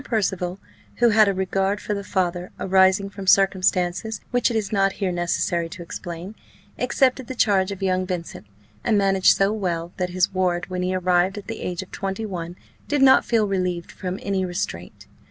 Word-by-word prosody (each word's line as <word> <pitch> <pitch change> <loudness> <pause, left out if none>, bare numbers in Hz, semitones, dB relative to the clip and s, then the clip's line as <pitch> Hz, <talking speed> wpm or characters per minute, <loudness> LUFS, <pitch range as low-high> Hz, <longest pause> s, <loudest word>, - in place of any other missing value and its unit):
Percival, 190 -6 -1 0.4
who 240 0 +4
had 215 -1 +5
a 200 - +2
regard 195 +2 0
for 210 - -3
the 200 -1 -4
father, 180 -2 -1
arising 190 +1 +3
from 195 -1 -9
circumstances 190 +2 +2
which 245 0 +2
it 235 - -3
is 210 -3 -2
not 195 -2 +2
here 195 -3 -2
necessary 175 -1 -1
to 170 +1 -8
explain, 175 +3 -7 0.5
accepted 260 -2 +1
the 260 - -5
charge 200 -4 +2
of 195 0 -6
young 185 -1 0
Vincent, 170 - -5 0.4
and 215 - +2
managed 195 -1 +4
so 195 +2 +2
well, 175 -5 -2
that 180 -1 -1
his 185 +1 0
ward 180 -1 0
when 180 0 -2
he 185 +1 -1
arrived 185 +1 +2
at 205 - -7
the 225 0 -6
age 180 +1 -3
of 185 - -18
twenty 195 +2 -4
one 175 -4 -5 0.3
did 290 -2 +2
not 265 -1 +6
feel 225 -3 +2
relieved 180 -3 -2
from 185 0 -5
any 195 -1 0
restraint. 175 - -5
190 Hz, 190 wpm, -23 LUFS, 180-200 Hz, 0.5 s, not